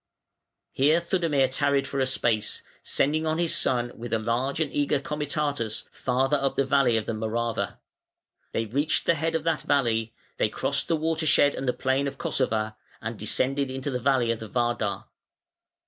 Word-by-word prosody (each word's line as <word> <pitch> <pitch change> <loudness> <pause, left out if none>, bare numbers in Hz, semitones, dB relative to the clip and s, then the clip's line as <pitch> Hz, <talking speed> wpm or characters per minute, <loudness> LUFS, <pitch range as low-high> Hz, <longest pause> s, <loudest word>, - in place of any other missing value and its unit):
Here 150 +5 +4
Theudemir 165 -6 +1
tarried 140 +1 +1
for 140 - -3
a 130 - +2
space, 115 -4 0 0.2
sending 155 +3 +1
on 155 0 +1
his 170 -1 +1
son 120 -7 +1
with 120 +1 -7
a - - +4
large 120 +6 -1
and 155 -3 -1
eager 145 0 +1
comitatus 145 -5 -2
farther 135 +3 +1
up 135 -1 -1
the 140 - +2
valley 130 -4 +3
of 110 - -2
the - - -2
Morava. 110 -1 -2 0.7
They 115 - -1
reached 140 +8 0
the - - +4
head 165 +1 -1
of 160 - 0
that 165 -2 +1
valley, 115 -5 +1 0.2
they - - +2
crossed 140 +5 -1
the 165 - +2
watershed 160 -2 +3
and 135 - -4
the 125 - +2
plain 130 +2 0
of 140 - -5
Kossova, 110 -4 -1 0.2
and 115 0 -5
descended 135 +6 0 0.2
the 130 -3 -1
valley 130 -2 +2
of 115 - -2
the 110 - -8
Vardar. 120 -4 -1
135 Hz, 175 wpm, -26 LUFS, 115-145 Hz, 0.7 s, Here